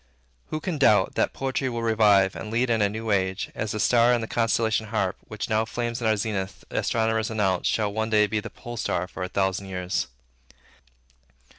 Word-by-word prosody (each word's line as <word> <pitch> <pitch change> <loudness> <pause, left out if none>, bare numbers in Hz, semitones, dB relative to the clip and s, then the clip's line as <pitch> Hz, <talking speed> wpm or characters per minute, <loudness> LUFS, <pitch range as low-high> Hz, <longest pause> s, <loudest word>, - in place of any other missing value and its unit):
Who 155 - -3
can 160 -1 -3
doubt, 105 -8 +4
that - - +1
poetry 135 0 -2
will 120 -1 -3
revive 105 -4 +4
and 110 - -6
lead 120 +2 +1
in 110 -2 +2
a 100 - +3
new 110 +1 -4
age, 95 -1 0
as 110 -1 -3
the 105 - -3
star 120 +2 +4
in 120 - -1
the 115 - -4
constellation 110 -1 +1
Harp, 100 -4 -1
which 110 -1 -5
now 110 0 +2
flames 120 +1 -3
in 115 - +1
our 110 -1 +3
zenith, 95 -2 -3
astronomers 110 -1 0
announce, 95 -5 0
shall 105 -2 0
one 110 +1 -1
day 105 -1 +4
be 105 +1 -1
the - - -7
pole 120 0 -9
star 90 -4 -1
for 95 - -9
a 90 - -2
thousand 95 +1 -1
years? 90 0 -2
110 Hz, 200 wpm, -25 LUFS, 100-115 Hz, -, doubt